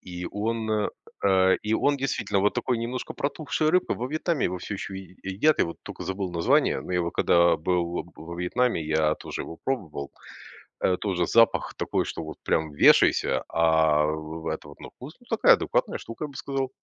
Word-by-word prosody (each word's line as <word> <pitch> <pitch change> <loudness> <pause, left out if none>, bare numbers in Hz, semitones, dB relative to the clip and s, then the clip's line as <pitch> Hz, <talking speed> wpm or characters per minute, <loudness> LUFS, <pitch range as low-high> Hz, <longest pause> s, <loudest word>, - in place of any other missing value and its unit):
и 90 -1 -7
он, 110 0 -1 0.4
э, 95 -1 +4
и 110 +1 0
он, 145 +5 +2
действительно, 135 -7 -1
вот 105 +2 +2
такой, 125 -2 0
немножко 120 +2 -4
протухшей 155 +2 -1
рыбы, 180 +2 +2
во 120 - -4
Вьетнаме 155 +1 -1
его 90 +1 -1
всё 105 - -5
еще 95 0 -6
е 95 -2 -11
е 95 - -4
едят. 155 +11 +3
Я - - +3
вот 85 - -7
тока - - -8
забыл 95 -1 -3
название, 85 -1 +2
но - - -7
его 90 -1 0
когда 85 0 +4
был 85 +1 -1
во 80 - -12
во 85 +1 -7
Вьетнаме, 90 +3 0
я 80 0 +2
тоже - - -6
его 80 - -9
пробовал. 80 - -3 0.7
Э, 90 - +2
тоже 90 -4 -1
запах 115 -1 +3
такой, - - -1
что, - - -5
вот, 80 0 -8
прям 80 -1 0
вешайся. - - +4
А 80 -2 +3
вы 80 +1 -4
в 80 - -6
это 80 -2 -4
вот 75 - -14
ну - - -9
вкус, - - -11
ну - - -22
такая, - - +6
адекватная - - 0
штука, 115 +6 -7
я - - -5
бы 140 - -15
сказал. 135 -2 -2
95 Hz, 205 wpm, -26 LUFS, 80-115 Hz, 0.7 s, такая